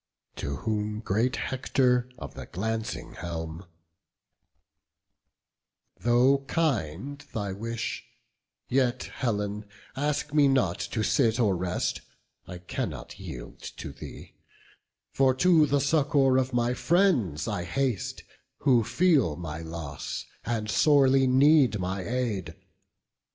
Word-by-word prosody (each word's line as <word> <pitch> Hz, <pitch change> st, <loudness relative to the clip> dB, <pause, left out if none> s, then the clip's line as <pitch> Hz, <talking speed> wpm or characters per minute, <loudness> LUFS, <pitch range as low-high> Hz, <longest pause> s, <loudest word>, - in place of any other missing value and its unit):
To 70 Hz, -, -3 dB
whom 105 Hz, +1 st, -2 dB
great 115 Hz, +5 st, 0 dB
Hector 125 Hz, -1 st, +1 dB
of -, -, -8 dB
the -, -, -9 dB
glancing 110 Hz, +4 st, -4 dB
helm: 85 Hz, +1 st, -6 dB, 2.3 s
"Though 125 Hz, +3 st, +4 dB
kind 135 Hz, -, -1 dB, 0.2 s
thy 100 Hz, -3 st, -2 dB
wish, 115 Hz, +2 st, -4 dB, 0.6 s
yet, 130 Hz, -1 st, +1 dB
Helen, 105 Hz, -3 st, -2 dB, 0.3 s
ask 145 Hz, +1 st, -1 dB
me 145 Hz, -2 st, +5 dB
not 125 Hz, -10 st, +2 dB
To 110 Hz, -, -2 dB
sit 115 Hz, +2 st, +2 dB
or 105 Hz, -5 st, +3 dB
rest; 90 Hz, 0 st, -2 dB, 0.5 s
I 90 Hz, -, -7 dB
cannot 90 Hz, 0 st, -5 dB
yield -, -, -8 dB
to -, -, -7 dB
thee: -, -, -10 dB, 0.8 s
For 130 Hz, -1 st, +3 dB
to 160 Hz, 0 st, +5 dB
the 145 Hz, 0 st, +2 dB
succour 140 Hz, -2 st, +3 dB
of 130 Hz, -1 st, -1 dB
our 120 Hz, +1 st, +1 dB
friends 125 Hz, -, +2 dB
I 90 Hz, -, -2 dB
haste, 125 Hz, +4 st, -2 dB, 0.4 s
Who 125 Hz, -4 st, +4 dB
feel 145 Hz, -, +3 dB
my 80 Hz, -2 st, -6 dB
loss, 80 Hz, -3 st, -6 dB, 0.2 s
and 115 Hz, -2 st, -2 dB
sorely 135 Hz, +1 st, +4 dB
need 135 Hz, -2 st, +5 dB
my 95 Hz, +1 st, -2 dB
aid. 110 Hz, -9 st, -2 dB
120 Hz, 115 wpm, -27 LUFS, 95-135 Hz, 2.3 s, me